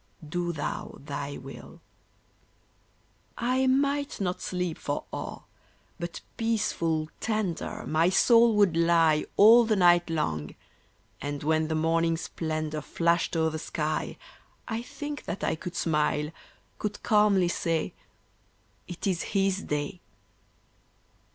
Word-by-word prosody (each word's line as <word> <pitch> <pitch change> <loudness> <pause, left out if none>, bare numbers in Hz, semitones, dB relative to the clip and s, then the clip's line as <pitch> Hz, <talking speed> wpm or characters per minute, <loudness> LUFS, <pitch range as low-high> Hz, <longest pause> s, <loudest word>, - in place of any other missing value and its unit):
Do 175 +2 -2
Thou 150 -3 -4
Thy 140 0 -5
will." 135 +1 -11 1.6
I 255 +2 +1
might 280 +2 +1
not 180 -2 -2
sleep 180 -3 -3
for 145 - -3
awe; - - -6 0.6
but 170 -1 -5 0.2
peaceful, 170 -9 0
tender, 215 -6 -2
My 160 +3 +3
soul 230 +3 +5
would 200 -5 +4
lie 165 -2 +4
All 230 +4 +8
the 220 -1 +1
night 175 -2 +5
long; 80 - -2 0.7
and 145 0 -4
when 155 +1 +2
the 160 - -1
morning 165 +1 +2
splendor 155 -2 -3
Flashed 170 +3 +1
o'er 160 0 +2
the 155 - -4
sky, 155 -1 -2 0.5
I 225 -1 -2
think 290 +3 -7
that - - -4
I - - +1
could 175 +2 -6
smile 150 -2 0 0.5
could 210 -1 -4
calmly 210 -4 +4
say, 165 -2 -1 0.9
"It 175 - -6
is 185 -4 0 0.2
His 195 0 +2
day." 150 +5 -3
170 Hz, 120 wpm, -28 LUFS, 155-210 Hz, 1.6 s, All